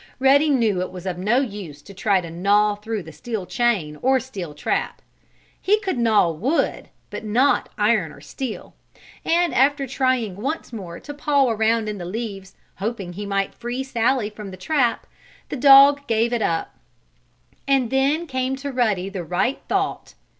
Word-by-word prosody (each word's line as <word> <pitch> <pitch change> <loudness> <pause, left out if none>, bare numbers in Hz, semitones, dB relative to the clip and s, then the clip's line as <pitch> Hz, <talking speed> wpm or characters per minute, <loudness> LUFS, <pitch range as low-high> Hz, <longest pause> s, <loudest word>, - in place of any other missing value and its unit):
Ruddy 280 +3 +4
knew 225 -9 +2
it 185 - -4
was 185 0 -9
of 180 -2 -3
no 225 +8 +2
use 195 - -7
to 200 - -12
try 195 -1 +1
to 170 -2 -8
gnaw 205 +4 +2
through 210 0 -5
the 160 - -11
steel 195 +6 -5
chain 195 -11 0
or 265 +1 +3
steel 195 - -7
trap. - - -2 0.6
He 420 +3 +3
could 380 -10 -2
gnaw 220 -7 +3
wood, 235 - -1 0.2
but - - -6
not 245 +7 +2
iron 210 -6 +2
or - - -14
steel. 260 -5 -7 0.5
And 340 +1 +2
after 275 +2 +3
trying 255 -7 0
once 275 +4 -4
more 180 -6 -7
to 290 - -8
paw 285 -2 +2
around 220 0 +1
in 210 -2 -4
the 175 - -6
leaves, 195 -1 -6 0.2
hoping 195 -3 -4
he 205 +3 -6
might 195 -1 -1
free 240 +2 -4
Sallie 240 -3 0
from 210 -1 -9
the 185 - -9
trap, 250 - 0 0.4
the - - -3
dog 280 +1 +7
gave 230 +1 +1
it 235 - 0
up. 165 -5 -2 0.9
And 270 -4 +2
then 280 +5 +1
came 260 -2 -2
to 280 +1 -5
Ruddy 215 -8 0
the 195 -2 -5
right 180 - -1
thought. - - -2
225 Hz, 175 wpm, -22 LUFS, 195-265 Hz, 0.9 s, dog